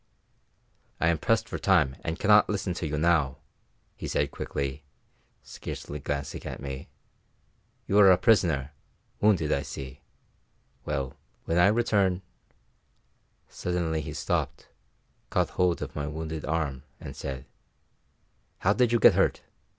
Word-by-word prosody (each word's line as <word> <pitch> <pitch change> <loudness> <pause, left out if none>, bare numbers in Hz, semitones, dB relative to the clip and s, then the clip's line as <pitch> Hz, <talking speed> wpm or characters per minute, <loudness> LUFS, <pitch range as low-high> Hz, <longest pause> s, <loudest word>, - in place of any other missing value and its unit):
"I 85 - +3
am 85 -2 +1
pressed 115 0 +1
for - - -5
time 80 -9 +3
and 80 +1 -3
cannot 105 +3 +5
listen 100 -3 -1
to 85 -1 -3
you 75 0 -2
now," 75 -4 +2 0.6
he - - -6
said 70 -1 0
quickly, 70 +1 -4 0.6
scarcely 75 - -7
glancing 70 0 -4
at - - -6
me. 70 -1 -6 1.0
"You 100 - +4
are 100 -2 +8
a 90 - +7
prisoner 85 - +3 0.5
wounded, 90 -8 +3
I 70 - +2
see; 70 -1 -8 0.8
well, 70 -1 -2 0.3
when 85 +1 +1
I 90 - +7
return 100 -4 +2 0.6
" - - -42
Suddenly 85 -3 0
he - - -6
stopped, - - -2 0.6
caught - - +1
hold 90 -4 +1
of 70 - -8
my 75 -1 -2
wounded 80 0 -5
arm, 75 -5 -1 0.2
and - - -8
said, 65 -1 -6 1.1
"How 100 - +2
did 125 0 +2
you 120 - +4
get - - +7
hurt? - - +1
80 Hz, 140 wpm, -28 LUFS, 70-95 Hz, 1.1 s, are